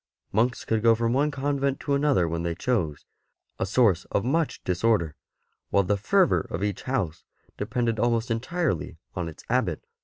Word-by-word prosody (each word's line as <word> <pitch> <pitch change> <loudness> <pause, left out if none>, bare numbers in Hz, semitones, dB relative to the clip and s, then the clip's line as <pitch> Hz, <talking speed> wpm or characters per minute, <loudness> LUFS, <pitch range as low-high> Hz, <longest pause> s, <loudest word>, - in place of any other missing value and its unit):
Monks 120 +4 +1
could 110 -1 +1
go 115 0 +5
from 115 +1 0
one 145 +3 +2
convent 140 -1 -1
to 145 - -1
another 140 - +3
when 85 0 -2
they 85 0 -2
chose 90 - -1 0.3
— - - -51
a 95 - 0
source 100 -5 +3
of 100 - -1
much 160 +4 0
disorder 90 -4 +1 0.3
— - - -50
while 100 - +3
the 100 +2 +1
fervour 180 - +2
of 90 - -3
each 100 -2 -2
house 105 - -2 0.3
depended 115 -3 -1
almost 120 0 +1
entirely 125 - -1 0.2
on 90 -2 -2
its 80 - -12
Abbot. - - 0
115 Hz, 180 wpm, -26 LUFS, 90-135 Hz, 0.3 s, go